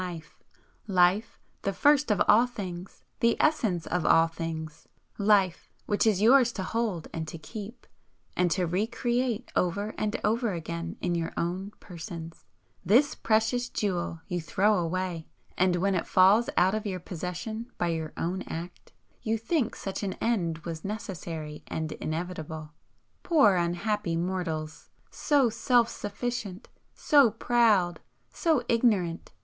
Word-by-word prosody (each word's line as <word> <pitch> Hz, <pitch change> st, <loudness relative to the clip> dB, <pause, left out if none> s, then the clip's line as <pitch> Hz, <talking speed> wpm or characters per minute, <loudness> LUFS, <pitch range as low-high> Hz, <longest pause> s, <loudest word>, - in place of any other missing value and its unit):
Life, 185 Hz, +3 st, +2 dB, 0.2 s
the 195 Hz, -, -1 dB
first 290 Hz, +4 st, +3 dB
of 210 Hz, -, +2 dB
all 235 Hz, +4 st, +6 dB
things, 185 Hz, -6 st, -7 dB, 0.2 s
the 235 Hz, 0 st, +3 dB
essence 220 Hz, -, +1 dB
of 180 Hz, -2 st, -1 dB
all 165 Hz, 0 st, +5 dB
things, 165 Hz, -1 st, -6 dB, 0.3 s
Life 200 Hz, -4 st, +2 dB, 0.2 s
which 205 Hz, +2 st, +1 dB
is 205 Hz, -2 st, +2 dB
yours 245 Hz, +1 st, +6 dB
to 190 Hz, -, -4 dB
hold 215 Hz, -5 st, -2 dB
and 160 Hz, -1 st, -4 dB
to 165 Hz, -, -7 dB
keep, 215 Hz, +8 st, -9 dB, 0.5 s
and 180 Hz, -1 st, +2 dB
to 180 Hz, +1 st, +1 dB
RE 185 Hz, +6 st, 0 dB
CREATE 240 Hz, 0 st, -1 dB
over 200 Hz, +4 st, 0 dB
and 215 Hz, -1 st, -1 dB
over 225 Hz, 0 st, +1 dB
again 170 Hz, 0 st, -5 dB
in 175 Hz, -, 0 dB
your 165 Hz, -1 st, -2 dB
own 185 Hz, +4 st, -2 dB
persons, 165 Hz, -2 st, -9 dB, 0.4 s
this 240 Hz, -, +4 dB
precious 225 Hz, +3 st, +1 dB
jewel 175 Hz, -5 st, -2 dB
you 180 Hz, -2 st, -2 dB
throw 205 Hz, +6 st, +2 dB
away, 175 Hz, -1 st, -3 dB, 0.3 s
and 180 Hz, -1 st, +2 dB
when 195 Hz, +3 st, +1 dB
it 180 Hz, -, -1 dB
falls 195 Hz, +5 st, +5 dB
out 185 Hz, +2 st, +4 dB
of 215 Hz, 0 st, -2 dB
your 185 Hz, -2 st, -3 dB
possession 185 Hz, +7 st, -6 dB
by 175 Hz, -, 0 dB
your 160 Hz, -2 st, -3 dB
own 180 Hz, +3 st, -2 dB
act, 170 Hz, +2 st, -8 dB, 0.3 s
you 225 Hz, 0 st, 0 dB
think 245 Hz, +1 st, -1 dB
such 195 Hz, -, -5 dB
an 195 Hz, -2 st, -2 dB
end 180 Hz, -9 st, -1 dB
was 165 Hz, -2 st, -5 dB
necessary 165 Hz, -7 st, -6 dB
and 160 Hz, -1 st, -3 dB
inevitable. 160 Hz, -2 st, -5 dB, 0.5 s
Poor 290 Hz, -, +5 dB
unhappy 175 Hz, +1 st, -1 dB
mortals! 165 Hz, -3 st, -3 dB, 0.2 s
So 280 Hz, -6 st, +2 dB
self 235 Hz, +1 st, +3 dB
sufficient, 210 Hz, -2 st, -5 dB, 0.3 s
so 285 Hz, -6 st, +5 dB
proud, 215 Hz, -6 st, +2 dB, 0.3 s
so 315 Hz, -8 st, +1 dB
ignorant! 205 Hz, -8 st, +1 dB
190 Hz, 140 wpm, -28 LUFS, 170-225 Hz, 0.5 s, all